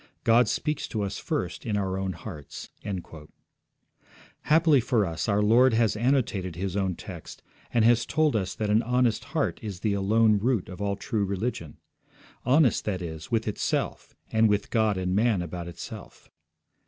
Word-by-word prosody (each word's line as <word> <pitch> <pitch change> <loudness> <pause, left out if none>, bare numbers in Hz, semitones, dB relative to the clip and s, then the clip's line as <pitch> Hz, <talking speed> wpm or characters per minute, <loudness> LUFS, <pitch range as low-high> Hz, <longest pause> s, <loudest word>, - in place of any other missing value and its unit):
God 115 +1 +5
speaks 150 +6 -2
to 105 -2 -2
us 100 - -4
first - - -3
in 105 -2 -1
our 95 -2 -1
own 95 -1 -2
hearts.' 75 -5 -9 1.7
Happily 155 -3 +5
for 115 -3 +1
us 85 +3 -3
our 105 0 +2
Lord 115 +3 +5
has 115 -2 +2
annotated 110 - 0
His 95 +1 -3
own 95 -3 0
text - - -10 0.3
and 115 -2 +3
has 120 0 +4
told 155 -3 +2
us 95 -4 -1
that 105 -2 -1
an 110 +2 +4
honest 125 -1 +1
heart - - -1
is 100 -4 -6
the 105 -2 +1
alone 105 +2 +3
root 115 -4 0
of 90 +2 -8
all 100 -1 0
true 105 +1 -2
religion. 100 -4 -3 0.7
Honest, 130 -1 +4
that 95 -4 -2
is, 80 -2 -7
with 115 -2 0
itself, 105 - -2 0.2
and 110 0 +4
with 105 0 0
God 110 -4 +2
and 90 0 -1
man 105 -4 +2
about 85 0 -6
itself. 85 - -10
105 Hz, 165 wpm, -27 LUFS, 95-120 Hz, 1.7 s, God